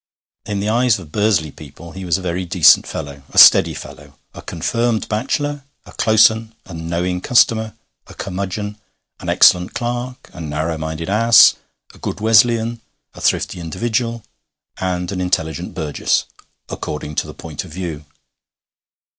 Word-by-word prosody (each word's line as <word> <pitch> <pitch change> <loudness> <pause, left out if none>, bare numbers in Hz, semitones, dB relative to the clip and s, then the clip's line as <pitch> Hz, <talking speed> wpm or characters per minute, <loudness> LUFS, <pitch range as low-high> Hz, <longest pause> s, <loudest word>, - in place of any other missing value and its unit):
In 100 -1 -2
the 105 - -1
eyes 120 +1 +2
of 85 -6 -12
Bursley 105 -7 +1
people 80 +4 -13
he 95 +2 -8
was 85 -3 +1
a 95 - -8
very 90 +1 -2
decent 85 - +5
fellow, 70 -1 -7
a - - -10
steady - - +8
fellow, 70 -1 -11 0.2
a - - -10
confirmed 115 +7 -2
bachelor, 145 +6 -2 0.2
a - - -14
close 110 0 +5
un, 110 0 -8
a 95 - -11
knowing 85 +2 -3
customer, 110 -2 +2 0.3
a - - -13
curmudgeon, 100 +2 -5 0.4
an - - -6
excellent 90 +2 +4
clerk, 120 +1 -5
a 85 - -9
narrow 80 +1 -3
minded 80 +1 -5
ass, 115 +3 +6 0.4
a - - -18
good 90 - -5
Wesleyan, 115 +1 +3 0.3
a - - -12
thrifty - - 0
individual, 115 +7 -3 0.5
and 90 -1 -3
an 95 -2 -3
intelligent 85 -2 -2
burgess 75 -6 -1 0.4
according 75 0 -6
to - - -2
the - - -10
point 80 -3 -7
of 90 - -13
view. 85 -3 -6
95 Hz, 155 wpm, -18 LUFS, 80-110 Hz, 0.5 s, steady